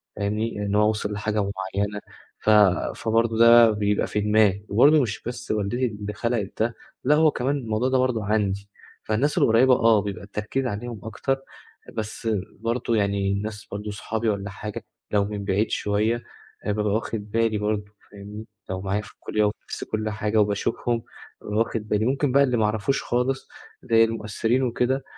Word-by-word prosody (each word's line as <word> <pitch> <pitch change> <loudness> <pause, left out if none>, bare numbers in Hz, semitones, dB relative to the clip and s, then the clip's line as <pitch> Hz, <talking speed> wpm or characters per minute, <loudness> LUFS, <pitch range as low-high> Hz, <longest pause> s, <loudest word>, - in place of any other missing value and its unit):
فاهمني، 105 +1 -2
إن 100 0 -1
هو 105 0 +4
وصل 105 -1 -2
لحاجة 105 +1 -1 0.4
مُعيّنة 100 +1 -1 0.4
ف - - +2 0.5
فبرضه 115 0 +1
ده 115 0 +8
بيبقى 105 -1 0
في 105 - -1
دماغي 105 -1 +3
وبرضه 145 +8 +6
مش 110 -5 -3
بس 120 +1 -5
والدتي 110 +4 0
اللي 105 -2 -4
خلقت 115 -3 -2
ده 115 +1 -1 0.3
لا 145 +4 +4
هو 155 0 +5
كمان 135 +4 -1
الموضوع 120 -1 -1
ده 130 - +2
برضه 125 -4 +1
عندي، 100 -1 0 0.3
فالناس 125 +8 0
القريبة 125 +3 +5
آه 115 -3 +4
بيبقى 100 -1 -5
التركيز 105 +6 -3
عليهم 115 -1 -4
أكتر 135 +4 -1 0.6
بس 110 +1 -4 0.3
برضه 115 +1 -1
يعني 100 -2 +1
الناس 105 +1 -4
برضه 105 +1 -4
صحابي 110 +2 -2
والّا 100 0 -2
حاجة 105 +2 -7 0.3
لو 100 -1 +2
من 100 -1 -5
بعيد 100 +3 +1
شوية 110 +3 0 0.4
هابقى 105 0 -1
ب 105 - 0
واخد 105 0 -2
بالي 115 -1 +1
برضه 105 0 -1 0.3
فاهمني، 105 +2 -9 0.2
لو 95 0 -3
معايا 100 +2 -1
في 105 - -13
الكلية 105 0 -1
وفي 105 +1 0
نفس - - -4
كل 110 0 -2
حاجة 105 0 -1
وباشوفهم 105 +3 0 0.4
واخد 110 0 -1
بالي، 105 +1 +1
ممكن 135 +1 +1
بقى 140 +1 +5
اللي 125 -3 +1
ما 110 - +2
اعرفوش 110 +6 0
خالص 125 +2 -1 0.4
زي 115 -1 +5
المؤثرين 115 +3 0
وكده. 125 +2 0
110 Hz, 170 wpm, -24 LUFS, 105-120 Hz, 0.6 s, ده